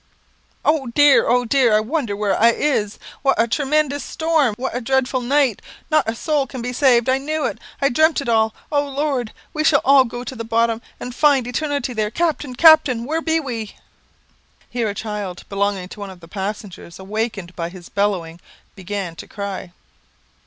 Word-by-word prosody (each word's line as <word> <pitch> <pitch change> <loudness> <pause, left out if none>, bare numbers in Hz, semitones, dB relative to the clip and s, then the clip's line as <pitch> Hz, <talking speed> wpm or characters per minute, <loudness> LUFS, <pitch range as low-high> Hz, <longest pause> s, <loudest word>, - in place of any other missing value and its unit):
"Oh, 300 -3 +2
dear! 285 +2 +5
oh, 245 +1 +3
dear! 240 -2 +3
I - - +5
wonder 235 -1 -2
where 205 -1 0
I 230 - +5
is; 215 -9 0 0.2
what 275 -1 +2
a 230 - +4
tre 285 +5 -1
men 305 +2 +3
dous 280 0 -5
storm 315 -8 +1
what 260 -1 -4
a 245 - -2
dreadful 265 +1 0
night 265 -2 +1 0.3
not 305 -7 +3
a 225 - -2
soul 290 +1 0
can 255 - -7
be 245 +1 -4
saved, 245 -3 +3
I 260 +1 +2
knew 305 +1 -2
it - - -3 0.2
I 275 - +4
dreampt 315 +5 +3
it 280 - -5
all. 220 -1 +2 0.2
Oh 290 -1 +1
Lord! 275 -4 -2 0.2
we 310 - -1
shall 300 -2 +4
all 275 0 +7
go 240 +1 -6
to 260 - -7
the 230 - -5
bottom, 230 0 +1 0.2
and 250 - -6
find 280 -2 +3
eternity 280 0 -2
there 215 -2 -1
Captain 295 -2 -2
captain 300 -6 +6
where 320 +4 -1
be 325 0 +1
we?" 230 -8 -5 1.0
Here 235 -3 -1
a 200 - -5
child 205 -4 -5
belonging 200 -2 -1
to 210 - -11
one 200 -1 -6
of 185 -2 -12
the 165 - -14
passengers, 195 -2 -6
awakened 200 -2 -4
by 170 -1 -3
his 175 -1 -12
bellowing, 180 -5 -2 0.3
began 190 -2 -5
to - - -9
cry. 200 -3 -6
240 Hz, 195 wpm, -20 LUFS, 210-280 Hz, 1.0 s, all